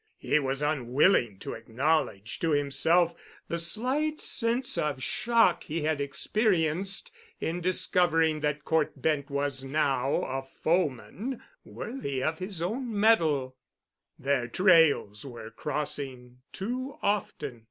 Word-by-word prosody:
He 150 Hz, -, +1 dB
was 135 Hz, 0 st, -2 dB
unwilling 130 Hz, -, +2 dB
to -, -, -5 dB
acknowledge 115 Hz, -2 st, -1 dB
to 165 Hz, -, 0 dB
himself 165 Hz, +4 st, +3 dB, 0.3 s
the 170 Hz, -, -2 dB
slight 260 Hz, -, 0 dB
sense 240 Hz, +2 st, 0 dB
of 145 Hz, -4 st, -1 dB
shock 230 Hz, -, +2 dB
he 160 Hz, 0 st, -3 dB
had 155 Hz, -2 st, 0 dB
experienced 190 Hz, -, 0 dB, 0.3 s
in 170 Hz, +2 st, -2 dB
discovering 165 Hz, -3 st, +2 dB
that 150 Hz, -1 st, -2 dB
Cort 155 Hz, -3 st, 0 dB
Bent 145 Hz, 0 st, 0 dB
was 140 Hz, -1 st, -2 dB
now 135 Hz, -1 st, +1 dB
a 135 Hz, +1 st, -3 dB
foeman 175 Hz, -, -2 dB, 0.2 s
worthy 140 Hz, -, -5 dB
of 160 Hz, 0 st, -1 dB
his 185 Hz, -3 st, -4 dB
own 225 Hz, +3 st, -2 dB
metal. 155 Hz, -12 st, +3 dB, 0.6 s
Their 135 Hz, -3 st, 0 dB
trails 160 Hz, -, +4 dB
were 120 Hz, -4 st, -9 dB
crossing 135 Hz, -3 st, -4 dB
too 255 Hz, +8 st, -4 dB
often. 200 Hz, -, -1 dB
155 Hz, 120 wpm, -28 LUFS, 135-185 Hz, 0.6 s, trails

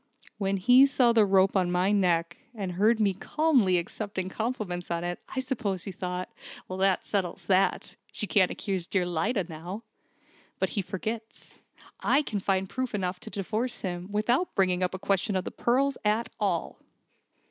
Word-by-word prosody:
When 195 Hz, -1 st, 0 dB
he 250 Hz, +7 st, +7 dB
saw 250 Hz, -4 st, +3 dB
the 220 Hz, -3 st, +5 dB
rope 190 Hz, 0 st, +4 dB
on 180 Hz, -2 st, +2 dB
my 180 Hz, +2 st, +2 dB
neck, 175 Hz, -4 st, +2 dB, 0.2 s
and 195 Hz, -4 st, -3 dB
heard 215 Hz, +6 st, +3 dB
me 200 Hz, -3 st, +3 dB
calmly 245 Hz, -, +2 dB
accepting 185 Hz, +1 st, -4 dB
compliments 215 Hz, -5 st, -3 dB
on 170 Hz, 0 st, -1 dB
it, 175 Hz, 0 st, -3 dB, 0.2 s
I -, -, 0 dB
suppose 225 Hz, -9 st, -2 dB
he 195 Hz, -, -5 dB
thought, 180 Hz, 0 st, -5 dB, 0.3 s
'That 190 Hz, 0 st, +1 dB
settles 195 Hz, -2 st, -2 dB
that. 190 Hz, +1 st, +1 dB, 0.2 s
She -, -, -3 dB
can't 190 Hz, -2 st, +3 dB
accuse 190 Hz, -4 st, -3 dB
dear 185 Hz, -3 st, +1 dB
Lyda 185 Hz, +5 st, 0 dB
now!' 175 Hz, +6 st, -7 dB, 0.7 s
But -, -, 0 dB
he 205 Hz, -, -1 dB
forgets. 220 Hz, +4 st, -6 dB, 0.5 s
I 290 Hz, +2 st, +3 dB
can 210 Hz, -7 st, -3 dB
find 190 Hz, 0 st, 0 dB
proof 255 Hz, +2 st, -3 dB
enough 180 Hz, -2 st, -2 dB
to -, -, -9 dB
divorce 220 Hz, +5 st, -3 dB
him, 180 Hz, 0 st, -4 dB
without 240 Hz, -, +1 dB
bringing 185 Hz, -2 st, +2 dB
up 185 Hz, 0 st, 0 dB
a -, -, -3 dB
question 195 Hz, +1 st, 0 dB
of 185 Hz, -, 0 dB
the -, -, -5 dB
pearls 270 Hz, +3 st, +1 dB
at 215 Hz, +2 st, +1 dB
all." 190 Hz, -6 st, -1 dB
195 Hz, 170 wpm, -28 LUFS, 180-220 Hz, 0.7 s, he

